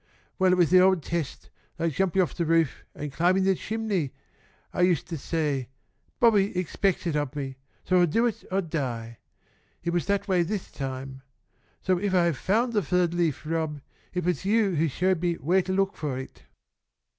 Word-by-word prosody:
Well, 185 -1 +4
it - - +5
was 175 -4 +3
the 185 - +8
old 185 -3 +4
test, 165 -4 -4 0.3
like 165 -1 0
jumping 190 +2 +2
off 175 - -4
the 170 - -1
roof 165 -2 +2
and 145 -1 -6
climbing 180 +5 +3
the 190 0 +4
chimney. 205 -8 -2 0.6
I - - -1
used 180 -2 +3
to 170 - -3
say 145 -4 -2 0.5
'Bobby 210 -6 +4
expects 185 +1 0
it 165 -3 0
of 145 -1 -1
me, 135 -2 -4 0.3
so 185 -1 +3
I'll 175 - +5
do 225 +10 +2
it 235 - -2
or 195 +1 +2
die.' 120 -9 -4 0.6
It 170 - -1
was 175 - 0
that 200 +1 0
way 185 -3 +3
this 190 +3 -3
time. 135 -1 -6 0.6
So 185 -1 +2
if 195 -1 0
I 180 - +5
have 170 -5 0
found 235 +5 +1
the 210 - +3
third 175 +1 +1
leaf, 165 -5 0
Rob, 160 -2 -2 0.3
it 180 -2 -2
was 180 0 0
you 205 0 +2
who 165 0 +2
showed 180 +4 0
me 175 -1 +1
where 175 +6 +2
to 185 +1 -4
look 195 +1 +1
for 145 -4 -3
it." 130 - -9
175 Hz, 195 wpm, -26 LUFS, 150-190 Hz, 0.6 s, the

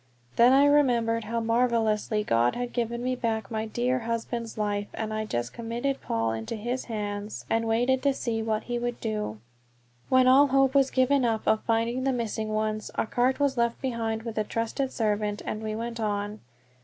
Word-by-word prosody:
Then 240 +2 +6
I 275 +2 +6
remembered 240 -6 +3
how 230 +2 -1
marvelously 225 -2 +1
God 120 - +2
had 245 0 -4
given 235 0 -2
me 255 0 0
back 225 -4 -2
my 220 0 -2
dear 245 +3 0
husband's 230 0 -4
life, 205 -1 -1
and 220 -1 -3
I 215 0 -2
just 120 - -3
committed 235 +4 -3
Paul 115 0 -1
into 110 - -4
his 240 +4 -3
hands 210 -2 -4
and 225 0 +1
waited 245 +4 +2
to 280 0 +2
see 225 -3 -2
what 220 -1 -1
he 240 0 -3
would 240 0 -3
do. 210 - -3 0.7
When 260 0 +5
all 270 +3 +7
hope 270 0 +3
was 275 -1 +4
given 260 +1 +2
up 225 -2 0
of 220 - +3
finding 230 +2 0
the 270 0 +1
missing 220 -2 -2
ones, 215 0 -1
a - - 0
cart 250 +4 +1
was 280 -2 +1
left 235 0 +1
behind 225 -3 -2
with 230 -2 -4
a - - +2
trusted 230 +5 -2
servant, 210 -2 -1
and 215 - -3
we 215 -1 -3
went 230 +1 -4
on. 205 -1 -2
230 Hz, 190 wpm, -27 LUFS, 215-245 Hz, 0.7 s, all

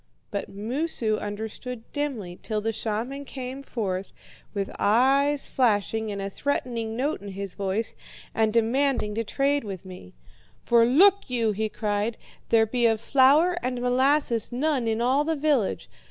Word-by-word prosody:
"But - - -3
Moosu 225 +1 -2
understood 220 +3 -6
dimly, 240 -12 -3
till 215 -2 -2
the 225 +2 -2
shaman 225 +6 -3
came 265 0 -6
forth, 195 -8 -3 0.4
with 200 -2 -3
eyes 275 +6 +3
flashing 220 -2 +1
and 200 - -4
a 195 - -3
threatening 230 -1 -2
note 285 +1 -1
in 205 - -9
his 195 -1 -5
voice, 200 +3 -2 0.4
and 220 -1 +2
demanded 235 0 +1
to 225 +2 -1
trade 280 +5 0
with 195 -3 -7
me. 180 - -11 0.4
'For 235 -1 +4
look 390 +9 +5
you,' 230 -3 +1
he 215 +1 -2
cried, 210 +1 -1 0.3
'there 225 -1 +5
be 235 +1 +2
of 225 -1 +1
flour 280 +9 +4
and 250 -1 -2
molasses 250 -1 +2
none 260 -1 0
in 225 +1 0
all 265 +4 +3
the 320 +1 0
village. 285 -8 0
230 Hz, 155 wpm, -26 LUFS, 210-275 Hz, 0.4 s, look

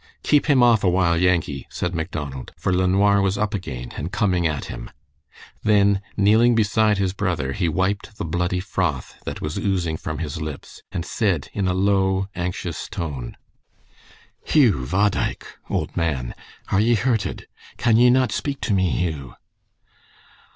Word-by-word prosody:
"Keep 150 0 +3
him 135 -5 +5
off 115 -3 +5
a 95 - +4
while, 90 -2 +2
Yankee!" 85 -6 +1
said 90 0 -3
Macdonald, 75 -5 -5
for 95 - 0
LeNoir 100 +2 +3
was 100 0 +1
up 105 +1 -1
again, 65 - -5
and 80 +5 -4
coming 90 -6 +1
at 75 -3 -3
him. - - -7 0.7
Then 100 -2 +3 0.2
kneeling 110 +4 +5
beside 110 -1 +3
his 95 -1 0
brother 85 -10 -1
he 85 0 0
wiped 95 +5 -1
the - - -3
bloody 90 +2 -1
froth 90 - -2
that - - -5
was 75 +1 -3
oozing 90 -5 -1
from 80 0 -5
his 80 0 -4
lips, 75 -2 -7
and 85 - -3
said 95 -10 -1
in 100 -2 -1
a 90 - +1
low, 95 0 +2
anxious 90 -2 -4
tone: 70 -8 -5 1.1
"Hugh, 105 - +3
bhodaich 100 +1 0 0.2
(old - - -2
man), 65 -7 -1 0.4
are 95 - +3
ye 120 +2 +4
hurted? 110 -4 -1 0.3
Can 115 -2 +3
ye 125 +1 +6
not 130 -2 +3
speak 140 +5 -3
to 105 - 0
me, 95 -2 +2
Hugh?" 75 -9 -3
95 Hz, 160 wpm, -22 LUFS, 80-105 Hz, 1.1 s, ye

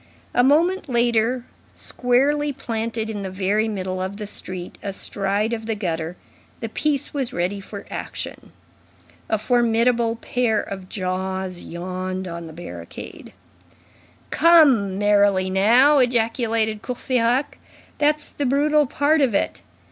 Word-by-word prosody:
A 245 - +4
moment 330 +5 +3
later, 240 0 +1 0.3
squarely 285 +4 +1
planted 230 -4 -3
in 215 -2 -4
the 190 - -4
very 200 +4 0
middle 185 -3 -3
of 190 +2 -4
the 210 - -5
street, 185 -3 -6
astride 200 +2 -1
of 225 -1 -4
the 225 - -1
gutter, 170 -3 -3 0.4
the 225 - -4
piece 290 +4 -1
was 270 -4 -2
ready 180 +3 -1
for 200 +1 -9
action. - - -6 0.8
A 220 - +2
formidable 235 0 +2
pair 235 -1 0
of 190 -2 -6
jaws 185 -1 -3
yawned 185 +2 -5
on 170 -1 -6
the - - -9
barricade. 90 - -9 1.0
"Come, 280 - +5
merrily 200 -2 +3
now!" 245 +10 +5
ejaculated 230 -3 +1
Courfeyrac. 250 +1 0 0.4
"That's 300 0 +1
the 285 - -2
brutal 295 +2 +3
part 290 +4 +2
of 250 -7 +2
it. - - -1
220 Hz, 125 wpm, -22 LUFS, 190-250 Hz, 1.0 s, Come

